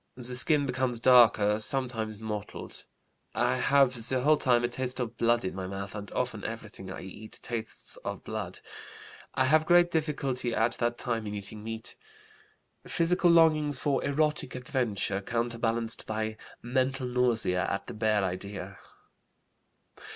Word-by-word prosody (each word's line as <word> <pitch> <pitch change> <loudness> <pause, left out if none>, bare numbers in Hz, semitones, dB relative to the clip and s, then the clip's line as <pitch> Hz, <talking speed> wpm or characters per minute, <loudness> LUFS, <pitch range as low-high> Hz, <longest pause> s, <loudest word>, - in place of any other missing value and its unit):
The 125 0 -3
skin 145 +3 +2
becomes 125 -2 0
darker, 115 -4 +6
sometimes 110 -2 -2
mottled. 105 -1 -6 0.5
I - - +2
have 130 -4 +3
the 130 -1 +1
whole 150 +3 +5
time 120 -4 +3
a - - +3
taste 125 +1 -4
of 120 -2 -3
blood 115 -1 +2
in 95 - -2
my 95 -1 -5
mouth 100 +1 -5
and 105 -1 -7
often - - -2
everything 95 - -7
I 95 - -6
eat 105 +3 -8
tastes 115 -2 -5
of - - -6
blood. - - -5 0.7
I 130 - +3
have 155 +3 +3
great 175 0 +5
difficulty 140 -6 -1
at 115 +2 +2
that 120 0 0
time 115 -4 -2
in 105 - -4
eating 105 +1 -7
meat. 115 0 -6 0.9
Physical 175 +1 +2
longings 155 -4 +5
for 140 0 0
erotic 150 +1 0
adventure, 120 -6 -1
counterbalanced 115 0 -2
by 110 0 -2 0.3
mental 130 +1 0
nausea 120 -7 +1
at 100 0 -2
the - - -7
bare 110 -2 +1
idea. 95 +2 -5
120 Hz, 145 wpm, -29 LUFS, 110-130 Hz, 0.9 s, darker